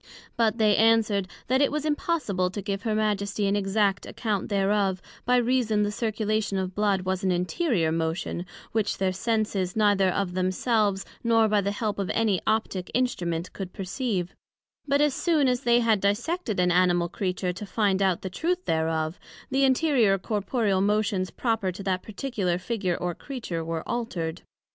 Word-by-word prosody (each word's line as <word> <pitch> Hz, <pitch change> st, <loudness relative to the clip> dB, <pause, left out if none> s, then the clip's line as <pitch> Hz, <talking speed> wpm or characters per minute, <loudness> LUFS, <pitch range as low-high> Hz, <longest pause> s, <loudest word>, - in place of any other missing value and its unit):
But 230 Hz, -1 st, +2 dB
they 215 Hz, -3 st, +4 dB
answered, 220 Hz, -3 st, +3 dB, 0.2 s
That 260 Hz, +2 st, +2 dB
it 285 Hz, -, +3 dB
was 300 Hz, 0 st, -2 dB
impossible 285 Hz, -, 0 dB
to 200 Hz, +2 st, -5 dB
give 200 Hz, -1 st, -3 dB
her 215 Hz, 0 st, -1 dB
Majesty 205 Hz, -1 st, 0 dB
an 200 Hz, +1 st, +2 dB
exact 200 Hz, 0 st, +1 dB
account 210 Hz, -4 st, -2 dB
thereof, 195 Hz, -1 st, +1 dB, 0.3 s
by 250 Hz, -, +3 dB
reason 240 Hz, -4 st, +2 dB
the 205 Hz, -, 0 dB
circulation 215 Hz, -2 st, -1 dB
of 190 Hz, 0 st, -2 dB
blood 205 Hz, -2 st, +1 dB
was 185 Hz, 0 st, -2 dB
an 190 Hz, -, +2 dB
interior 180 Hz, -, 0 dB
motion, 165 Hz, +2 st, -2 dB, 0.2 s
which 220 Hz, -2 st, 0 dB
their 190 Hz, -1 st, 0 dB
senses, 205 Hz, -3 st, -1 dB
neither 205 Hz, -3 st, +3 dB
of 185 Hz, -1 st, -1 dB
themselves, 195 Hz, +2 st, +1 dB, 0.2 s
nor 225 Hz, -1 st, +4 dB
by 210 Hz, -1 st, +2 dB
the 200 Hz, -, -1 dB
help 205 Hz, 0 st, -2 dB
of 195 Hz, -, -2 dB
any 215 Hz, -5 st, +2 dB
Optick 215 Hz, -4 st, 0 dB
Instrument 175 Hz, -9 st, -1 dB
could 190 Hz, -2 st, -6 dB
perceive; 195 Hz, -2 st, -3 dB, 0.5 s
but 280 Hz, +1 st, +3 dB
as 295 Hz, -2 st, +3 dB
soon 310 Hz, -4 st, +2 dB
as 250 Hz, 0 st, +1 dB
they 240 Hz, -2 st, +4 dB
had 220 Hz, -4 st, +2 dB
dissected 220 Hz, -, -1 dB
an 180 Hz, 0 st, +3 dB
Animal 175 Hz, -1 st, +3 dB
Creature, 180 Hz, 0 st, -2 dB
to 195 Hz, +4 st, -7 dB
find 200 Hz, -2 st, +1 dB
out 190 Hz, -3 st, +1 dB
the 190 Hz, -, -3 dB
truth 355 Hz, -, -1 dB
thereof, 160 Hz, +1 st, -1 dB, 0.3 s
the 270 Hz, +1 st, +2 dB
interior 260 Hz, -7 st, +3 dB
corporeal 205 Hz, 0 st, 0 dB
motions 205 Hz, -2 st, +1 dB
proper 225 Hz, -6 st, -1 dB
to 195 Hz, +2 st, -8 dB
that 185 Hz, -1 st, -1 dB
particular 210 Hz, -6 st, -2 dB
figure 185 Hz, -1 st, -2 dB
or 175 Hz, -1 st, -2 dB
creature, 205 Hz, -, -5 dB
were 165 Hz, 0 st, -4 dB
altered. 180 Hz, -9 st, -3 dB
205 Hz, 170 wpm, -26 LUFS, 185-225 Hz, 0.5 s, they